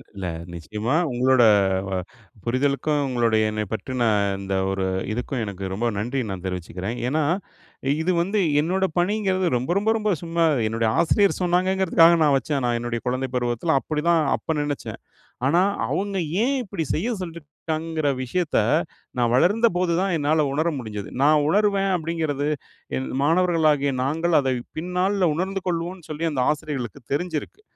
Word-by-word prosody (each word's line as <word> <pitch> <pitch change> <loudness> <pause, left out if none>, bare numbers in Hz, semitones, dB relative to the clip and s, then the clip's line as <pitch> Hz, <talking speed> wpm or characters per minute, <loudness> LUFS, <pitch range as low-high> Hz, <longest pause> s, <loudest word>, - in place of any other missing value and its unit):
இல்ல, 95 -2 -5 0.3
நிச்சயமா, 105 - -3 0.2
உங்களோட 125 0 +3 0.4
வ - - -5 0.5
புரிதலுக்கும் 140 +4 +1
உங்களுடைய 115 -3 +2
என்ன 110 0 -2
பற்றின 125 +2 -2 0.4
இந்த 95 0 -3 0.2
ஒரு 95 -1 -1 0.3
இதுக்கும், 125 +2 -3
எனக்கு 95 -1 -5
ரொம்ப 115 +5 -2
நன்றி 125 +6 -2
நான் 95 -1 -5
தெரிவிச்சுக்கிறேன். 90 +5 -4
ஏன்னா 155 +3 +1 0.8
இது 180 +3 +1
வந்து 200 +4 0 0.2
என்னோட 190 +4 +1
பணிங்கிறது 190 -1 +1
ரொம்ப, 130 +7 -4
ரொம்ப, 205 +2 +1
ரொம்ப 215 -1 0
சும்மா, 170 0 0 0.2
என்னுடைய 115 0 0
ஆசிரியர் 200 +4 +3
சொன்னாங்கங்கிறதுக்காக 180 -1 +4
நான் 145 -2 +4
வச்சேன் 135 +1 -2
நான் 120 -1 +1
என்னுடைய 120 -1 -3
குழந்தை 130 +1 -1
பருவத்தில. 120 +5 0
அப்படிதான் 160 +2 +1 0.2
அப்ப 160 - -3
நினைச்சேன். 145 -1 -4 0.5
ஆனா 170 +6 +4 0.3
அவுங்க 200 0 -1 0.2
ஏன் 275 +3 +2
இப்டி 170 -6 -4
செய்ய 205 +10 -1
சொல்லியிருக்காங்கங்கிற 160 -2 -4 0.2
விஷயத்த 170 +5 0 0.6
நான் 120 -1 +2
வளர்ந்தபோதுதான் 185 - +2
என்னால 150 +1 +2
உணர 155 +4 +1
முடிஞ்சது. 105 -3 -6
நான் 150 0 +5
உணர்வேன் 200 +1 +2
அப்படிங்கிறது 155 -3 -2 0.5
என் 65 0 -3 0.2
மாணவர்களாகிய 160 -4 +3
நாங்கள் 165 +4 +1
அதை 135 -2 0 0.3
பின் 180 +3 -4
நாள்ல 190 0 +2
உணர்ந்து 190 +3 -2
கொள்வோம்னு 175 0 -3
சொல்லி 155 +2 -2
அந்த 135 - -2
ஆசிரியர்களுக்கு 145 -8 -5
தெரிஞ்சிருக்கு. 165 - -3
155 Hz, 140 wpm, -23 LUFS, 125-175 Hz, 0.8 s, நான்